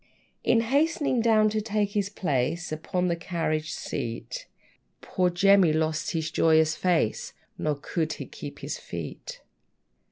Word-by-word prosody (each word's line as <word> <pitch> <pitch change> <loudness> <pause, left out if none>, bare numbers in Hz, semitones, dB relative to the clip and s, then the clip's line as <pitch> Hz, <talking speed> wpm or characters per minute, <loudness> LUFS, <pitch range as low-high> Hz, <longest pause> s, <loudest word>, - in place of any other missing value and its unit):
In 230 - +4
hastening 280 +1 +1
down 215 -2 +4
to 215 0 0
take 210 -1 -1
his 205 -1 0
place 165 -2 -1
Upon 180 +4 -1
the 170 - +1
carriage 165 -2 -2
seat, 115 0 -5 0.5
Poor 180 -1 0
Jemmy 185 -1 +5
lost 155 0 0
his 160 -1 -2
joyous 160 -1 +4
face; 175 -11 0 0.3
Nor 150 -1 0
could 160 +1 -2
he - - -7
keep - - -9
his - - -5
feet. - - -7
175 Hz, 135 wpm, -27 LUFS, 155-205 Hz, 0.5 s, Jemmy